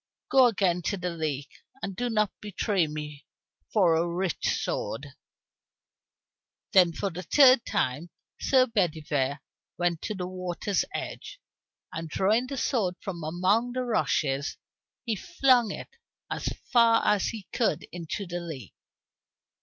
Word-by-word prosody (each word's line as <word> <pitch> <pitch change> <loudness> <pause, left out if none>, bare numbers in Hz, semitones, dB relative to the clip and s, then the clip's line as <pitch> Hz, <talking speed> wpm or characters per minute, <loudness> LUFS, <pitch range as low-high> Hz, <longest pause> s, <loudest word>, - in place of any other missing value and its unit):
Go 260 -2 +7
again 185 -5 +1
to 200 - 0
the 180 -1 -3
lake, 150 -4 -3 0.3
and 195 -1 -3
do 245 +4 -1
not 215 -3 +1
betray 205 -3 0
me 150 -1 -7 0.4
for 185 -6 +4
a 165 +2 +2
rich 175 0 -1
sword." 135 +6 -2 1.6
Then 180 -3 +6
for 195 +4 -3
the 175 +2 -6
third 260 +3 +6
time 140 +7 -1 0.3
Sir 260 -2 +4
Bedivere 155 - 0 0.4
went 175 -2 0
to 215 - -3
the 180 -2 -3
water's 185 +1 -2
edge, - - -6 0.5
and 165 -1 -5
drawing 215 +10 +2
the 275 - -5
sword 205 -10 0
from 175 -4 -6
among 185 +9 +1
the 255 0 -1
rushes, 145 - 0 0.5
he 225 -3 0
flung 255 - +3
it - - -6 0.4
as - - -3 0.3
far 230 -2 +5
as 210 -2 +3
he 215 -5 -6
could 235 - +1
into 175 +3 -5
the 175 0 -4
lake. 155 - -8
185 Hz, 140 wpm, -27 LUFS, 165-225 Hz, 1.6 s, Go